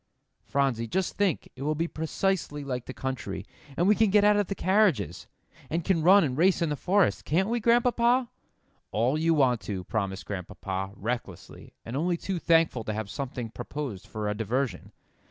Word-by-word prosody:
"Phronsie, 135 -5 0
just 185 +9 -1
think 200 -7 0
it 130 - -11
will 150 +2 0
be 165 +3 -1
precisely 160 -2 -2
like 125 -3 -4
the - - -4
country, 100 -8 -4 0.3
and 175 - +2
we 210 - +7
can 215 0 +3
get 205 +1 +4
out 210 0 +5
of 205 -2 +1
the 195 - -3
carriages, 185 - +1 0.4
and 165 +2 -1
can 180 -4 +2
run 190 +4 +7
and 130 -5 -1
race 180 +5 +3
in 170 -3 0
the 150 - -1
forest. 190 +5 +2
Can't 190 +7 +1
we, 240 +1 0
Grandpapa?" 240 +2 +3 0.6
"All 120 +6 +1
you 165 +1 +2
want 130 -5 +3
to," 95 -3 -4
promised 95 -2 -3
Grandpapa, 95 0 -4
recklessly, 110 -4 -6
and 115 - -5
only 170 +4 0
too 185 +1 -3
thankful 165 -8 +3
to 110 - -2
have 105 -1 -4
something 125 -5 -5
proposed 130 -7 -6
for 105 -1 -4
a 105 - 0
diversion. 115 +5 -2
150 Hz, 185 wpm, -27 LUFS, 115-190 Hz, 0.6 s, we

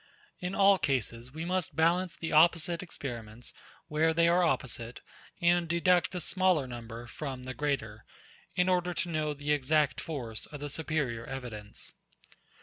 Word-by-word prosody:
In 180 +1 -3
all 195 -1 +6
cases, 125 -4 -1
we 160 +3 -5
must 180 0 -1
balance 170 +2 +2
the 165 - -5
opposite 165 +1 +4
experiments, 120 -8 -7 0.3
where 160 +2 +2
they 170 0 +5
are 175 +2 +4
opposite, 125 -7 -1 0.4
and 175 -1 +3
deduct 170 -1 +3
the 180 - -3
smaller 185 -5 +2
number 120 -1 -7
from 130 0 -6
the 130 0 -5
greater, 120 -8 -2 0.5
in 180 0 +3
order 180 -1 +1
to 175 - -2
know 155 -2 -1
the 145 +1 -2
exact 150 0 +2
force 120 -9 -5
of 145 - -9
the 145 +1 -4
superior 140 -7 -2
evidence. 115 -6 -7
150 Hz, 150 wpm, -30 LUFS, 125-170 Hz, 0.5 s, all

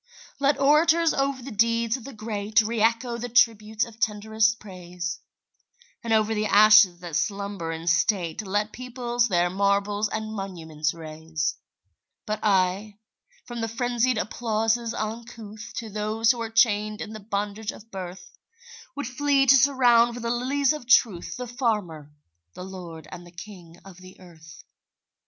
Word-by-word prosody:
Let 280 0 +2
orators 315 +4 +4
over 275 -2 -1
the 270 - -7
deeds 230 +2 +1
of 255 -3 -9
the 275 - -8
great 215 -1 -1
Re 225 0 -2
echo 235 +1 +1
the 245 +1 -5
tributes 220 -2 +2
of 230 -1 -15
tenderest 220 0 +1
praise, 180 -3 -7 0.8
And 230 - -4
over 220 0 +3
the 215 0 -1
ashes 210 -4 +6
that 175 -3 -6
slumber 195 0 -2
in 165 0 -6
state 170 +1 +1
Let 205 +1 -2
peoples 245 -1 -2
their 175 -3 +1
marbles 200 +2 0
and 220 0 -4
monuments 165 -6 -4
raise; 160 -1 -4 0.7
But 215 -1 -3
I, 200 +1 +1 0.5
from 240 -1 -6
the 225 - -1
frenzied 240 +1 0
applauses 225 +1 -1
uncouth, 220 -1 -7
To 230 - -5
those 215 +2 +1
who 240 -2 -4
are 225 - -3
chained 215 -2 +2
in 220 - -6
the 215 - -7
bondage 205 +1 -3
of 225 +1 -15
birth, 180 -1 -9 0.6
Would 285 - -4
flee 275 +2 +2
to 270 +1 +7
surround 245 -3 +4
with 245 - -7
the 235 - -1
lilies 265 +4 +1
of 300 -6 -8
truth 195 -8 +3
The 250 - -5
farmer, 210 - -3 0.4
the 180 - -8
lord 175 -4 -9
and 175 -1 -9
the 175 - -14
king 175 -2 -12
of 190 -2 -13
the 185 0 -15
earth. 165 -3 -15
215 Hz, 155 wpm, -25 LUFS, 190-235 Hz, 0.8 s, to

